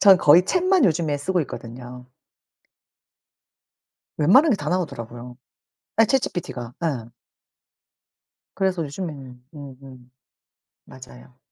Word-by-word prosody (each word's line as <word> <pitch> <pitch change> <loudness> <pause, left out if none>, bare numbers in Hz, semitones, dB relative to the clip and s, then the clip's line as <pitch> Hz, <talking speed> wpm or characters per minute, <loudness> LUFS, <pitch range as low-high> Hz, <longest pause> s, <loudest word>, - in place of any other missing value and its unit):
저는 195 -3 +7
거의 160 +3 +6
챗만 365 - +2
요즘에 160 -4 +1
쓰고 180 +6 -1
있거든요. 125 0 -10 2.1
웬만한 255 - +5
게 - - +3
다 - - -4
나오더라고요. 120 -8 -5 0.6
예 225 - +7
ChatGPT가. 160 - -2
예. 120 -8 -3 1.5
그래서 190 -3 0
요즘에는 140 -5 -8
음음 130 -3 -13 0.7
맞아요. 125 -1 -15
145 Hz, 250 characters per minute, -23 LUFS, 125-185 Hz, 2.1 s, 저는